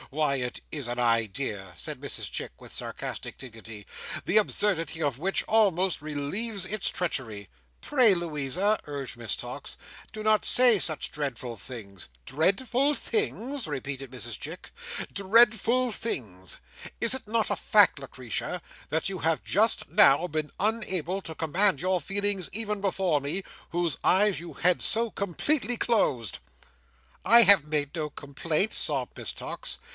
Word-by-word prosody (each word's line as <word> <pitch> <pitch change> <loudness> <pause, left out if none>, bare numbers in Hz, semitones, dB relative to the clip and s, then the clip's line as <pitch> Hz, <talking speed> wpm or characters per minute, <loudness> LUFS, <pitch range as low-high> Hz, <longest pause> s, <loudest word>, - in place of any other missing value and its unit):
Why, 145 -1 0
it 125 -1 -3
is 145 -5 -4
an 120 - -3
idea," 115 -4 -1
said - - -4
Mrs - - -2
Chick, - - -5
with - - -10
sarcastic - - -5
dignity, 110 -4 -10 0.4
"the 185 - +2
absurdity 180 -6 +1
of 140 -4 -1
which 190 +4 +1
almost 190 -6 +2
relieves 175 +8 -2
its 210 +1 0
treachery." 115 - -3 0.3
"Pray, 250 -8 +5
Louisa," 170 +5 0
urged 140 -4 -5
Miss 120 -3 -2
Tox, - - -6 0.3
"do 215 - -7
not 215 0 +3
say 245 -4 +7
such 155 -3 +2
dreadful 130 -5 -4
things." 100 - -9 0.2
"Dreadful 245 - +1
things!" 285 - -1
repeated 135 -2 -5
Mrs 120 -3 -5
Chick. 165 +5 -7 0.4
"Dreadful 230 +4 +3
things! 100 - -4 0.4
Is 230 - +6
it 260 -4 -3
not 225 0 0
a - - +2
fact, 205 -7 +4
Lucretia, 130 +6 -4 0.3
that 160 +1 0
you 195 -2 -3
have 160 0 0
just 220 +4 +2
now 180 -5 +5
been 155 -2 -3
unable 195 -4 -1
to 160 -3 -7
command 165 +1 +2
your 185 0 0
feelings 200 -2 -1
even 210 -1 -3
before 185 -6 +1
me, 160 +8 -2 0.3
whose 170 -3 -1
eyes 200 +1 +3
you 170 - -9
had 180 +1 +2
so 230 0 +1
completely 240 - -1
closed?" 135 - +1 0.8
"I 235 +1 +8
have 195 -7 +7
made 150 0 -2
no 155 -2 -2
complaint," 155 +8 -2
sobbed - - -2
Miss - - -2
Tox. - - -5
175 Hz, 145 wpm, -27 LUFS, 140-210 Hz, 0.8 s, I